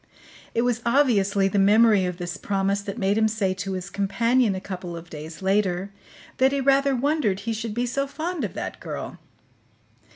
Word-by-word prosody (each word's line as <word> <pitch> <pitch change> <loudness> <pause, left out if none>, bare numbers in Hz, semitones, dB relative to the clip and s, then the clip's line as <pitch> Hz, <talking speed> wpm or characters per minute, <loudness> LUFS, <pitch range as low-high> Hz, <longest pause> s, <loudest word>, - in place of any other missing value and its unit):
It 230 - +2
was 245 -1 0
obviously 205 -7 +3
the 200 +1 0
memory 210 0 +5
of 180 -1 -3
this 175 -1 -5
promise 195 0 -1
that 200 +2 -6
made 200 0 +1
him 220 - +4
say 210 -4 0
to 195 +1 -4
his 185 +1 -5
companion 215 +3 +1
a - - -3
couple 180 -3 -6
of 170 +1 -11
days 155 +3 -8
later 195 -1 +1 0.5
that 265 +1 +4
he 280 - 0
rather 275 0 +3
wondered 250 -7 0
he 225 +2 -2
should 220 -1 -4
be 240 +1 0
so 275 +3 -1
fond 325 +3 -4
of - - -4
that - - -5
girl. - - -6
205 Hz, 190 wpm, -24 LUFS, 190-245 Hz, 0.5 s, memory